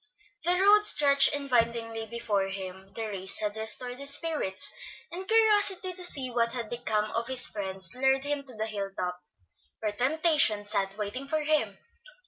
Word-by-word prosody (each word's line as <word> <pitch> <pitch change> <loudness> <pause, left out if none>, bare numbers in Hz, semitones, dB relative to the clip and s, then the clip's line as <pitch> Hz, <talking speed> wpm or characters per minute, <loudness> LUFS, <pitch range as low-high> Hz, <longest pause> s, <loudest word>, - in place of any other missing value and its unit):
The 355 +1 +3
road 415 +2 +6
stretched 285 -8 +6
invitingly 230 -4 -2
before 210 -4 -2
him, 190 0 -9
the 225 - -4
race 190 -2 -4
had 210 0 -3
restored 245 +3 +1
his 280 0 -4
spirits, 295 - -4 0.4
and 370 +2 -7
curiosity 410 -4 +3
to 360 0 -5
see 270 -7 +3
what 235 -1 -1
had 235 -4 -4
become 215 -3 -2
of 230 +1 -3
his 260 -1 +4
friends 190 -3 -4
lured 265 +1 +1
him 290 0 -2
to 255 -3 -11
the 215 0 -3
hill 205 -3 -5
top, 180 0 -4 0.6
where 215 -1 -3
temptation 265 -3 +2
sat 195 -1 -3
waiting 215 +6 -6
for 310 +1 -2
him. 290 -10 -1
235 Hz, 165 wpm, -27 LUFS, 205-290 Hz, 0.6 s, road